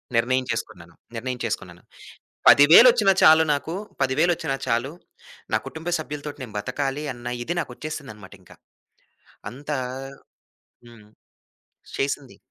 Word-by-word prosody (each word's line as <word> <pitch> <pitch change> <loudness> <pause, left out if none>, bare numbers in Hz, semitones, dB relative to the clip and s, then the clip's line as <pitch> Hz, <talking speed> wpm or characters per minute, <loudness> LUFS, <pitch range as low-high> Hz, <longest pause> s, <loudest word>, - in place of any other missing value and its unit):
నిర్ణయం 130 +2 +1
చేసుకున్నాను. 85 -6 -6 0.2
నిర్ణయం 125 +2 -4
చేసుకున్నాను. - - -5 0.7
పదివేలొచ్చినా 195 - +7
చాలు 160 +1 +7
నాకు. 150 +4 -3 0.3
పదివేలొచ్చినా 135 +1 +1
చాలు. 120 +3 -1 0.6
నా - - +4
కుటుంబ 160 +2 -7
సభ్యులతోటి 150 -1 -7
నేను 115 -5 -9
బతకాలి 135 +5 -3
అన్న 120 0 -13 0.2
ఇది 175 +2 -3
నాకొచ్చేసిందననమాటింకా. 115 - -9 1.0
అంతా 145 +4 -5 1.1
హ్మ్. 115 -3 -16 0.9
చేసింది. 135 -1 -3
135 Hz, 95 wpm, -23 LUFS, 120-155 Hz, 1.1 s, పదివేలొచ్చినా